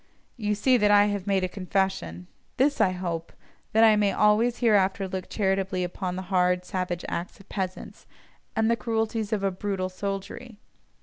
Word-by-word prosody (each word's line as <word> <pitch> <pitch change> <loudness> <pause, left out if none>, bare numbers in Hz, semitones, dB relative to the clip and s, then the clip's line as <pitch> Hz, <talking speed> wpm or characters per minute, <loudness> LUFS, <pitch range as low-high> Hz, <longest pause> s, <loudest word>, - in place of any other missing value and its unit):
You 210 -3 -1
see 250 +5 +3
that 210 -2 +3
I 205 0 +6
have 200 -1 -5
made 195 -2 +2
a - - +1
confession: 185 - -2 0.3
this 280 -1 +2
I 205 - +5
hope—that 180 +5 -3
I 220 -1 +7
may 205 -1 +2
always 215 +4 +3
hereafter 200 -4 +2
look 185 0 -5
charitably 195 -2 0
upon 180 0 -4
the 185 - -4
hard, 180 0 +2
savage 180 -2 -3
acts 175 +4 -5
of 195 - -17
peasants, 185 -2 -5 0.5
and 220 0 +2
the - - +3
cruelties 225 -2 -2
of 210 -2 -1
a 195 - +1
"brutal" 185 0 -3
soldiery. 200 +4 -6
195 Hz, 170 wpm, -26 LUFS, 185-215 Hz, 0.5 s, I